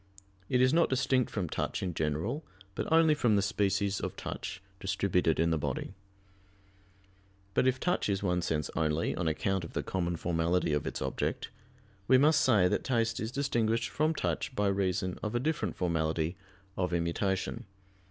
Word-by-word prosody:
It 125 - +3
is 130 +2 +4
not 170 +1 +4
distinct 130 -1 +2
from 95 -5 -2
touch - - -2
in 90 -2 -2
general, 80 - -2 0.3
but 100 - -4
only 160 -1 +6
from 120 -7 +2
the 100 - +3
species 100 -1 0
of - - -4
touch - - -5 0.2
distributed 90 -4 +1
in 85 0 +3
the 80 - +1
body. - - -3 1.6
But 130 - +3
if 130 0 +2
touch 175 -9 0
is 100 0 0
one 90 -2 +1
sense 75 -4 -1
only, 80 0 0
on 85 - -1
account 95 +4 0
of 85 - -8
the - - -2
common 85 -2 -1
formality 85 0 0
of 75 - -1
its - - -3
object: - - -2 0.6
we 130 - +7
must 150 +3 +5
say 105 -8 +4
that - - 0
taste 115 -3 0
is 110 +1 -3
distinguished 120 -4 0
from 155 +2 +1
touch 130 - -2
by 105 -3 +2
reason 95 -2 -1
of 105 +2 -3
a - - +2
different 125 - -1
formality 80 -1 0 0.4
of 90 -1 -1
immutation. 90 +3 -1
95 Hz, 170 wpm, -30 LUFS, 85-125 Hz, 1.6 s, we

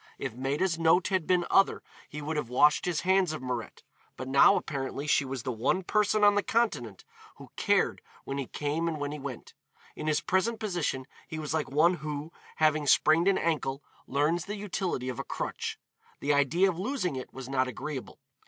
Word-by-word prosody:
If 130 -5 -4
Maida's 145 +8 -1
note 165 +3 +4
had 185 -5 0
been 180 -1 +3
other, 195 - +3 0.3
he 150 0 -7
would 155 +2 -3
have 150 -6 -2
washed 150 +4 +4
his 175 -4 0
hands 190 -3 +2
of 155 - -5
Mirette, 125 -3 -5 0.3
but 130 - -6
now 135 +1 +6
apparently 135 0 -3
she 145 - +3
was 130 -3 -5
the 130 - -2
one 125 +11 0
person 210 +2 +2
on 205 0 +7
the 205 - +2
Continent 150 - -1 0.3
who - - -13
cared - - +1 0.2
when 140 +1 -4
he 135 - -4
came 150 +3 -2
and 160 -2 -2
when 145 0 -3
he 150 - -6
went. 135 -3 -7 0.4
In 155 - -5
his 155 -1 +2
present 215 +5 0
position 175 -11 -2 0.2
he 155 - -6
was 155 -1 -4
like 155 -4 -1
one 155 +6 +4
who, 150 +1 -5 0.2
having 155 -1 +2
sprained 160 +6 +4
an 195 -1 +4
ankle, 145 -4 -1 0.2
learns 150 +5 +1
the 205 - -4
utility 185 -9 -3
of 125 -2 -4
a - - -2
crutch. - - -4 0.4
The 145 +1 +1
idea 150 +7 +3
of 180 -3 -2
losing 190 - -2
it 130 - -6
was 130 -1 -8
not 130 -1 +1
agreeable. 135 +1 -6
155 Hz, 200 wpm, -29 LUFS, 135-180 Hz, 0.4 s, on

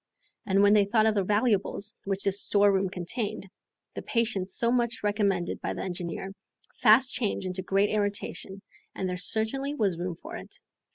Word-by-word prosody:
And 195 0 +3
when 205 0 +6
they 205 -1 +5
thought 215 +2 +2
of 220 - +3
the 200 -2 +1
valuables 210 0 0
which 195 0 -2
this 195 0 +2
storeroom 200 -2 +3
contained, 200 +4 -4 0.5
the - - -5
patience 220 -6 -1
so 235 0 +3
much 240 0 0
recommended 200 -4 0
by - - -3
the - - -4
engineer, 180 +1 -5 0.5
fast 250 +3 +5
changed 210 -5 -2
into 185 0 -3
great 195 +2 +1
irritation, 205 -1 -3 0.3
and 190 - -2
there 180 - -2
certainly 245 +9 -1
was 195 - 0
room 180 -1 -3
for - - -9
it. - - -10
200 Hz, 170 wpm, -28 LUFS, 190-220 Hz, 0.5 s, when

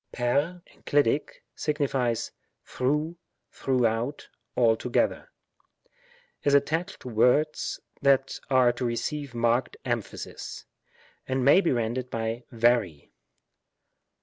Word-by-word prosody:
ntQ 145 +9 0 0.2
(enclitic), 145 0 +1
signifies 135 -6 -1 0.3
through^ 150 +6 -1 0.4
tJirougJiout^ 125 +1 0 0.3
alto 115 0 +2
geiher; 310 - +1 1.2
is 140 -1 +4
attached 165 +6 0
to - - -9
words 125 +7 +2 0.2
that 135 -1 +2
are 130 -2 +5
to 120 - -5
receive 130 +3 -3
marked 120 +2 +1
emphasis, - - -5 0.6
and 130 -1 0
may 145 +7 +7
be 170 - +1
rendered 120 +1 -1
by 115 +1 -3
wry. 115 -10 +1
130 Hz, 95 wpm, -27 LUFS, 120-145 Hz, 1.2 s, may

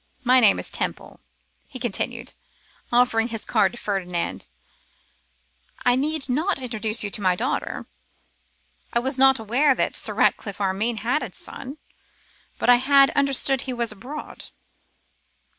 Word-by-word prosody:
My 255 +1 +5
name 215 -5 +5
is - - -4
Temple,' - - -4 0.5
he 270 - -9
continued, 240 +1 -3 0.6
offering 240 -2 +3
his 225 -2 -5
card - - +2
to - - -9
Ferdinand. 180 -6 -3 1.4
'I 245 0 +4
need 295 +2 0
not 315 +10 0
now 265 - -6
introduce 220 -2 0
you 205 - -4
to 215 - -2
my 185 -2 +2
daughter. 245 +8 -3 1.1
I - - 0
was 260 +2 -1
not 265 -1 +5
unaware 255 +6 +2
that - - -1
Sir - - +2
Ratcliffe 200 -2 0
Armine 205 +3 -1
had 250 +7 0
a - - -6
son, 275 +2 -6 0.8
but - - -2
I 245 0 +7
had 275 +2 +4
understood 275 -1 +2
he 260 -2 -4
was 235 -2 -1
abroad. 255 +9 -8
245 Hz, 145 wpm, -23 LUFS, 220-270 Hz, 1.4 s, I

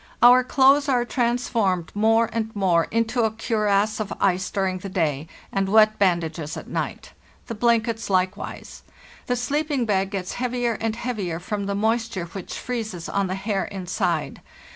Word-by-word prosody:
Our 250 +1 +8
clothes 275 +2 +4
are 245 -2 +2
transformed 235 -8 0
more 225 +2 +3
and 220 -1 -1
more 180 -4 +2
into 230 +2 0
a 220 - +3
cuirass 215 -1 0
of 210 -2 -3
ice 190 -1 +1
during 190 -2 -1
the 195 - -7
day, 155 -5 -1 0.2
and 195 -1 0
wet 215 +1 +5
bandages 170 -5 0
at - - -8
night. - - -4 0.3
The 230 - -5
blankets 230 0 +1
hkewise. 185 +1 -2 0.5
The 245 - +1
sleeping 280 +1 -1
bag 195 -3 +1
gets 190 -3 -4
heavier 245 -1 0
and 225 -1 -1
heavier 210 -9 -3
from 200 +2 -4
the 200 - -1
moisture 220 -3 0
which 175 +2 -7
freezes 220 -9 -4
on 200 -1 0
the 185 - -2
hair 195 0 -1
inside. 185 -2 -2
215 Hz, 160 wpm, -23 LUFS, 190-235 Hz, 0.5 s, Our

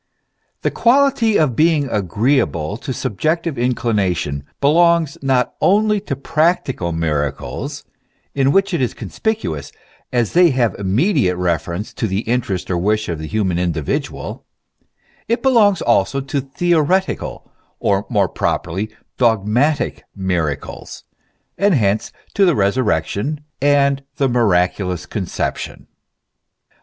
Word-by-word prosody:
THE - - +1
quality 240 -3 +3
of 145 -7 +2
being 155 -1 +3
agreeable 100 - 0
to 135 +2 -6
subjective 155 - -1
inclination 100 - 0
belongs 165 +1 +3
not 130 -3 +1
only 210 +2 +3
to 190 -8 -4
practical 140 - 0
miracles, 75 -4 -3 0.5
in 135 0 +2
which 195 +3 +2
it 170 - 0
is 125 - -1
conspicuous, 215 - -3 0.4
as 120 -3 0
they 175 0 +6
have 125 -5 +1
immediate 105 - +1
reference 90 +2 -2
to 110 - -2
the 95 +1 -1
interest 115 -7 -2
or 90 - 0
wish 105 +3 0
of 85 -3 -3
the 80 - -5
human 95 -4 0
individual; 80 -5 -3 0.8
it 235 +3 0
belongs 220 -8 +4
also 120 +3 +2
to 135 +1 -2
theoretical, 175 +6 0 0.3
or 100 +1 0
more 100 -6 +2
pro - - 0
perly 95 +6 -5 0.3
dogmatic 120 +5 +1
miracles, 90 -7 -3 0.6
and 200 -2 +4
hence 105 -4 +1 0.2
to 200 - +3
the 175 -5 +4
Kesurrection 105 - 0 0.2
and 140 -1 +3
the 135 - +1
Miraculous 90 -6 +1
Conception. 95 -5 -4
120 Hz, 120 wpm, -19 LUFS, 95-155 Hz, 0.8 s, they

